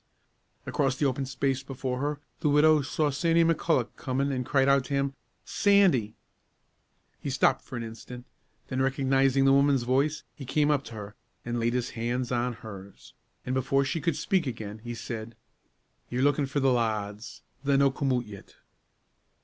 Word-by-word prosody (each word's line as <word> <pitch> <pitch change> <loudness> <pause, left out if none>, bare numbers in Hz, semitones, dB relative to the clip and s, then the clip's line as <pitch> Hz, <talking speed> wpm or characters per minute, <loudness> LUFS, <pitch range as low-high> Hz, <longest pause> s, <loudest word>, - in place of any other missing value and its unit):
Across 135 -2 0
the 145 - +1
open 135 0 -1
space 135 0 -1
before 130 -1 -4
her, 145 +1 -2 0.2
the 150 - +1
widow 150 +1 +5
saw 145 +2 0
Sandy 165 +4 +3
McCulloch 165 -6 +1
coming, 135 +1 -1
and 130 -1 -1
cried 135 +1 +2
out 140 -1 +4
to 140 - -2
him, 140 0 0 0.3
"Sandy!" 185 - +3 1.0
He - - -4
stopped - - +2
for - - -8
an 115 - -4
instant, 120 +2 -9 0.4
then, 130 0 -2
recognizing 135 0 +2
the 135 - +6
woman's 140 -2 +3
voice, 135 +5 +1
he 140 - -10
came 145 +3 +1
up 145 -2 +1
to 115 - -9
her, 105 0 -8 0.3
and 120 0 -2
laid 115 +1 +1
his 125 -1 -1
hands 120 +2 -2
on 125 0 0
hers, 100 -4 -11 0.3
and, 125 - -2
before 135 +1 +1
she 160 +4 -2
could 170 -1 0
speak 185 -7 0
again, 110 -3 -6
he 120 +1 -6
said, 115 -1 -6 0.7
"Ye're 125 +2 -1
lookin' 145 0 +2
for 140 +2 -1
the 135 -1 +3
lads. 110 -2 -3 0.2
They're 140 -1 +3
no' 140 -1 +4
come 135 0 -1
oot 125 -1 0
yet." 100 -2 -12
135 Hz, 175 wpm, -28 LUFS, 120-140 Hz, 1.0 s, the